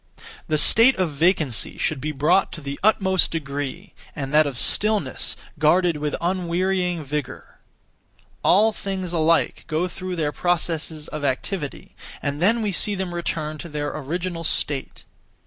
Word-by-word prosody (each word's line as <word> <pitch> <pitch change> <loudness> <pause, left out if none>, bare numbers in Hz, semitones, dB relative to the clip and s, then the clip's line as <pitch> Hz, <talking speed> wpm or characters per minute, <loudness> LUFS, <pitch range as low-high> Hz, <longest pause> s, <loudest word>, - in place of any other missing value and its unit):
The 155 - +1
(state 230 - +6
of) 185 -4 0
vacancy 150 - +1
should 150 -4 -1
be 155 +3 -2
brought 150 +7 +2
to 160 - -7
the 140 0 -6
utmost 190 -3 +3
degree, 145 +4 -5 0.2
and 135 -1 -5
that 155 0 +5
of 135 -3 -5
stillness 210 - +1 0.2
guarded 170 +1 +3
with 150 0 -2
unwearying 180 -1 0
vigour. 150 -1 -5 0.8
All 215 +4 +5
things 190 -4 -4
alike 165 0 +2
go 165 +3 0
through 185 0 -5
their 155 -3 -1
processes 160 -2 -1
of 150 -1 -6
activity, 145 +3 -3 0.2
and 145 +2 -3
(then) 225 +5 +3
we 210 - 0
see 205 +3 +2
them 190 -2 -3
return 155 -3 -3
(to 170 - -7
their 145 -1 -3
original 165 +4 -4
state). 145 -3 -2
165 Hz, 145 wpm, -23 LUFS, 150-185 Hz, 0.8 s, state